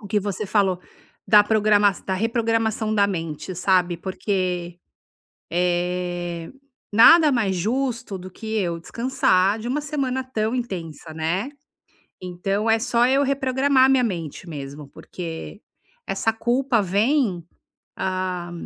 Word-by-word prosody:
o 205 - -10
que 210 - +2
você 205 +1 -3
falou 190 -3 +1 0.5
da 210 +1 +7
programa 210 -1 +3
da 190 - -1
reprogramação 225 0 0
da 200 -1 +4
mente, 165 -1 -4
sabe, 180 -1 +2
porque, 180 -1 -3 0.7
eh, 175 -1 -2 0.4
nada 305 +8 +7
mais 215 -7 +1
justo 235 +3 -2
do 185 0 -9
que 220 +4 -5
eu 170 -4 -2
descansar 200 -2 +1
de 225 - -6
uma 275 +5 -1
semana 270 -3 -2
tão 225 -3 -2
intensa, 170 - -5
né. 170 - -1 0.7
Então 195 +4 -2
é 225 0 +4
só 235 +1 +2
eu 270 +2 +3
reprogramar 265 0 +2
a - - +5
minha 265 -1 +4
mente 170 -4 -5
mesmo, 145 -1 -8
porque 170 +6 -8 0.5
essa 225 - 0
culpa 240 +2 +1
vem 200 - +1 0.5
ah, 185 -2 -3
200 Hz, 130 wpm, -23 LUFS, 180-235 Hz, 0.7 s, da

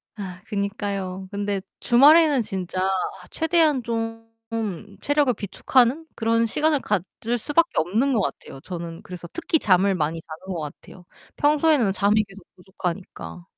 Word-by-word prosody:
아 185 -3 -7
그니까요. 200 -2 -3
근데 200 -1 -2 0.2
주말에는 290 +3 +6
진짜 185 -3 -4
아 190 -1 -2
최대한 320 -5 +2
좀 225 0 -3 0.7
체력을 290 -2 +2
비축하는 250 - +1
그런 230 0 +2
시간을 300 +5 +2
가질 210 +4 -2
수밖에 320 +8 +2
없는 225 - +2
것 220 - +2
같아요. 135 - -5
저는 170 -1 -7
그래서 180 -2 -8
특히 330 -2 +1
잠을 195 0 +3
많이 160 0 -1
자는 165 +5 -8
것 165 - -3
같아요. 155 +4 -10 0.3
평소에는 295 -6 +3
잠이 205 +3 +3
계속 195 -1 -14
부족하니까. 180 -1 -6
205 Hz, 315 characters per minute, -24 LUFS, 185-265 Hz, 0.7 s, 주말에는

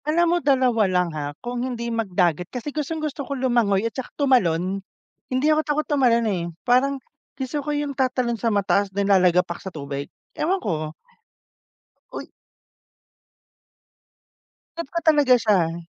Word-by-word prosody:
Alam 340 +3 +3
mo - - +3
2 255 -5 +3
lang 180 -1 +1
ha. 145 -1 -5
Hung 240 0 -3
hindi 235 -2 -3
magdagat 180 -6 0
kasi 260 +3 -6
gustong-gusto 305 -1 -3
ko 280 0 -4
lumangoy 235 -6 +2
at 230 - -2
tsaka 260 - -6
tumalon. 195 - +2 0.5
Hindi 260 +3 +1
ako 310 - +2
takot 305 0 -1
tumalon, 245 -5 +2
eh. 190 -6 -1 0.2
Parang 260 +3 +3 0.4
gusto 265 +2 -3
ko 290 - -6
yung 290 -1 -1
tatalon 255 -2 0
sa 230 +2 0
mataas 200 -1 +1
na 200 - +2
lalagapak 180 -3 +3
sa 190 - -6
tubig. 140 -3 -6 0.2
Ewan 360 +5 0
ko 155 - -3 1.2
Uy - - -8 2.5
Trip 335 -4 -4
ko 340 - -1
talaga 290 -5 +5
siya. 175 -8 +1
235 Hz, 145 wpm, -23 LUFS, 185-280 Hz, 2.5 s, talaga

